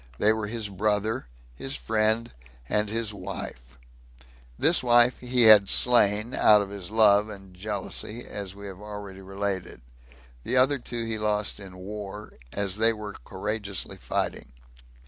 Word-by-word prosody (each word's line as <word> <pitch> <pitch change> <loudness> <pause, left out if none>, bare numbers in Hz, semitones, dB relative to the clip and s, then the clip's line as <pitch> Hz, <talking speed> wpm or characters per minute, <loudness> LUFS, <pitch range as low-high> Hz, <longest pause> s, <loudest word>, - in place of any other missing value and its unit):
They 110 +8 +3
were 110 -1 -3
his 110 -1 -3
brother, 105 - -1 0.3
his 135 - -2
friend, 110 +1 0 0.3
and 105 - 0
his 110 -1 -1
wife. 85 -11 -8 0.8
This 165 +3 +4
wife 120 0 +4
he 125 -1 +2
had 105 -3 +8
slain, 115 -2 +3
out 105 -1 +6
of 100 -1 -4
his 100 -4 -7
love 105 -1 +5
[and 95 -2 -11
jealousy], 105 +3 -4
as 100 -2 -6
we 100 0 -10
have 95 0 -9
already 105 -2 -9
related; 95 -5 -4 0.6
the 125 - 0
other 135 +2 +3
two 120 -1 -4
he 110 -1 -3
lost 105 -1 0
in 95 -2 -11
war, 105 +2 -8 0.2
as 100 -1 -1
they 115 +1 +4
were 105 -1 -7
courageously 100 0 -5
fighting. - - -4
105 Hz, 145 wpm, -26 LUFS, 100-110 Hz, 0.8 s, had